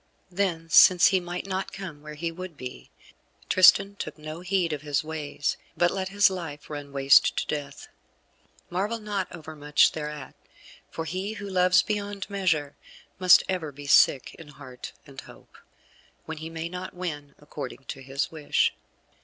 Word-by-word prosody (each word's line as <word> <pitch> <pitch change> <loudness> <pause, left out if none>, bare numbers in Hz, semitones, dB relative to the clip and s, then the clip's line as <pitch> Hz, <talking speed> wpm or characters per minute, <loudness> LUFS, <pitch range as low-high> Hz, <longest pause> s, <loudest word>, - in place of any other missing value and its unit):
Then 175 -3 -1
since 175 +2 +7
he 190 - +2
might 175 +1 -5
not 190 0 -3
come 185 -7 -8
where 150 0 -9
he 165 +2 -3
would 180 -2 -9
be, 125 - -9 0.6
Tristan 195 +2 +6
took 155 -4 -6
no 155 +1 -8
heed 180 -1 0
to 150 -2 -3
his 145 0 -1
ways, 155 -2 -3 0.2
but 175 0 +3
let 190 -1 -3
his 205 0 +5
life 160 -6 -7
run 145 -1 -7
waste 140 0 +4
to - - 0
Death. 145 -2 -5 0.8
Marvel 200 +6 -1
not 205 -3 -3
overmuch 155 -3 +1
thereat, 150 -2 -6 0.6
for 165 - -5
he 190 +5 -3
who 205 -1 -7
loves 180 -1 +4
beyond 205 -2 -3
measure 160 -8 0 0.4
must 185 -1 +7
ever 175 -5 -2
be 145 +1 -11
sick 140 -1 +4
in 160 - -11
heart 135 -4 -10
and 135 -2 -10
hope, - - -17 0.7
when 160 0 -6
he 160 +1 -6
may 165 0 -5
not 180 +2 -7
win 150 -6 -6
according 145 -2 -8
to 135 - -6
his 135 +2 -3
wish. 155 -2 +1
165 Hz, 160 wpm, -26 LUFS, 145-185 Hz, 0.8 s, since